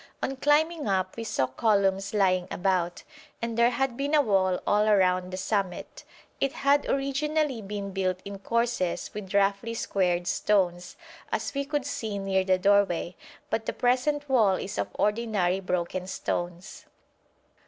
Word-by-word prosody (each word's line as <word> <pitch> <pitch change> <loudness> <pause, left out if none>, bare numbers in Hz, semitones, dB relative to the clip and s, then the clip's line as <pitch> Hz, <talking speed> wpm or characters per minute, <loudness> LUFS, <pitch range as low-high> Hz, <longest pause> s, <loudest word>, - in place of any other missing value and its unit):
On 270 - -1
climbing 300 +2 +2
up 190 -1 0
we 230 - -5
saw 135 -11 0
columns 195 - +1
lying 185 -3 +2
about, 180 -2 -1 0.4
and 230 -1 -3
there 235 +1 +4
had 250 0 -1
been 280 +4 0
a 295 - +6
wall 190 -5 +2
all 210 +1 +3
round 185 -1 +2
the 185 - -4
summit. 190 -2 -3 0.4
It 275 +1 0
had 285 -2 +2
originally 275 -1 0
been 200 -1 -5
built 185 -1 -1
in 200 0 -7
courses 230 -5 -1
with 200 -2 -6
roughly 200 +3 +1
squared 180 -5 0
stones, 180 -2 0 0.4
as - - -2
we 280 0 -2
could 290 -1 -2
see 220 -7 -3
near 195 -1 0
the 185 0 +2
doorway, 185 -3 +2 0.4
but 225 - -1
the - - -1
present 275 +4 +1
wall 220 -8 +4
is 190 - -5
of - - 0
ordinary 210 -4 +1
broken 180 0 -2
stones. 175 0 -4
200 Hz, 155 wpm, -27 LUFS, 185-245 Hz, 0.4 s, a